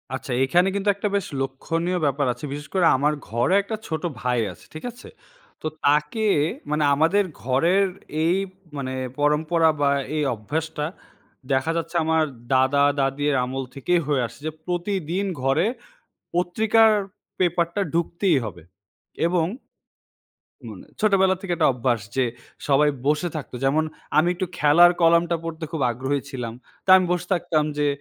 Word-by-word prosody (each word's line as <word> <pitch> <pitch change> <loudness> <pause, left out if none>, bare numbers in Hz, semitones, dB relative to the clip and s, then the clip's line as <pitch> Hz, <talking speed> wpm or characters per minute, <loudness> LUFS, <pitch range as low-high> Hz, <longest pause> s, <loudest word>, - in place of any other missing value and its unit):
আচ্ছা। 130 +1 -6
এখানে 175 +8 +3
কিন্তু 200 +1 0
একটা 200 +1 -2
বেশ 200 -3 -1
লক্ষণীয় 165 +7 -2
ব্যাপার 140 0 +1
আছে 150 - -8
বিশেষ 145 +1 -6
করে 185 -3 +3
আমার 145 +3 +2 0.2
ঘরে 120 - +1
একটা 210 +3 -4
ছোটো 160 +1 -2
ভাই 125 -1 +1
আছে। - - -19
ঠিক 155 - -8
আছে? 240 - -14 0.5
তো - - -2 0.2
তাকে 150 +9 +2 0.5
মানে 150 0 +1
আমাদের 165 +8 +3 0.2
ঘরের 165 +11 +2 0.4
এই 170 +2 +3 0.4
মানে 130 -2 -3 0.3
পরম্পরা 160 +3 +3
বা 140 - +4 0.3
এই 155 - +1
অভ্যাসটা 150 +7 -3 0.7
দেখা 135 +4 +1
যাচ্ছে 165 +1 -4
আমার 160 0 +2 0.3
দাদা-দাদির 140 +1 +2
আমল 135 +1 -4
থেকেই 175 +6 +1
হয়ে 145 -3 +1
আসছে 115 - -10
যে - - -2
প্রতিদিন 180 0 -2 0.2
ঘরে 135 +7 +2 0.7
পত্রিকার 220 +6 +3 0.5
পেপারটা 175 +1 +1
ঢুকতেই 170 +1 +1
হবে। 90 -5 -8 0.7
এবং 170 -2 +1 1.2
মানে - - -10
ছোটবেলা 195 -3 +4
থেকে 190 -2 -4
একটা - - +4
অভ্যাস 120 -2 0 0.2
যে 130 - +3 0.4
সবাই 145 +1 +4 0.2
বসে 150 +4 +1
থাকতো। 145 -4 -7
যেমন 150 +4 +2 0.3
আমি 165 +3 +4
একটু 185 +1 -2
খেলার 165 +4 +6
কলামটা 170 +1 +4
পড়তে 165 0 -5
খুব 160 -4 -2
আগ্রহী 130 +4 -2
ছিলাম। 125 -4 -5 0.3
তো - - -31
আমি 185 - +3
বসে 180 0 -2
থাকতাম 155 -3 0
যে 145 - +2
155 Hz, 145 wpm, -23 LUFS, 140-175 Hz, 1.2 s, খেলার